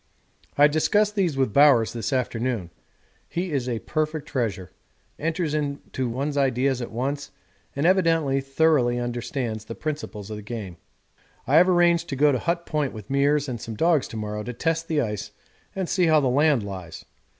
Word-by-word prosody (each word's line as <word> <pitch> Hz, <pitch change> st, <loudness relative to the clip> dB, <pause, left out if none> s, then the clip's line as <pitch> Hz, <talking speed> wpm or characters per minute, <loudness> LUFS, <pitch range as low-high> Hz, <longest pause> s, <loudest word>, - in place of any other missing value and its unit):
I 145 Hz, +1 st, +7 dB
discussed 205 Hz, +8 st, +2 dB
these 180 Hz, -9 st, 0 dB
with 130 Hz, -6 st, +1 dB
Bowers 140 Hz, -6 st, +5 dB
this 115 Hz, +3 st, -3 dB
afternoon 120 Hz, -7 st, -1 dB, 0.6 s
he 175 Hz, +1 st, -3 dB
is 130 Hz, -4 st, -1 dB
a 120 Hz, -, -1 dB
perfect 155 Hz, +3 st, -3 dB
treasure, 105 Hz, -, -3 dB, 0.5 s
enters 160 Hz, 0 st, -1 dB
into 140 Hz, -4 st, -3 dB
one's 140 Hz, +5 st, -2 dB
ideas 130 Hz, -1 st, +1 dB
at 120 Hz, -, -5 dB
once, 140 Hz, +5 st, -3 dB, 0.5 s
and 140 Hz, +3 st, -1 dB
evidently 165 Hz, -7 st, +3 dB
thoroughly 135 Hz, -3 st, +2 dB
understands 120 Hz, -2 st, -3 dB
the 115 Hz, -, -7 dB
principles 145 Hz, -9 st, -5 dB
of 105 Hz, -, -4 dB
the -, -, -7 dB
game. 105 Hz, -5 st, -7 dB, 0.7 s
I 140 Hz, +5 st, +4 dB
have 180 Hz, +3 st, +6 dB
arranged 175 Hz, -1 st, +3 dB
to 135 Hz, -, -2 dB
go 145 Hz, +2 st, +4 dB
to 130 Hz, -, 0 dB
Hut 170 Hz, 0 st, -1 dB
Point 150 Hz, -4 st, -1 dB
with 105 Hz, -3 st, -10 dB
Meares 145 Hz, +1 st, +2 dB
and 120 Hz, -4 st, -5 dB
some 115 Hz, -, -6 dB
dogs 160 Hz, +3 st, +2 dB
to 115 Hz, -, -8 dB
morrow 105 Hz, 0 st, -4 dB
to 125 Hz, +3 st, -5 dB
test 165 Hz, +6 st, -1 dB
the 155 Hz, -2 st, +1 dB
ice 105 Hz, -4 st, -3 dB, 0.5 s
and 190 Hz, -2 st, -2 dB
see 180 Hz, -1 st, +2 dB
how 155 Hz, -1 st, +5 dB
the 135 Hz, -3 st, +1 dB
land 140 Hz, -2 st, +3 dB
lies. 95 Hz, -5 st, -8 dB
140 Hz, 180 wpm, -24 LUFS, 120-155 Hz, 0.7 s, I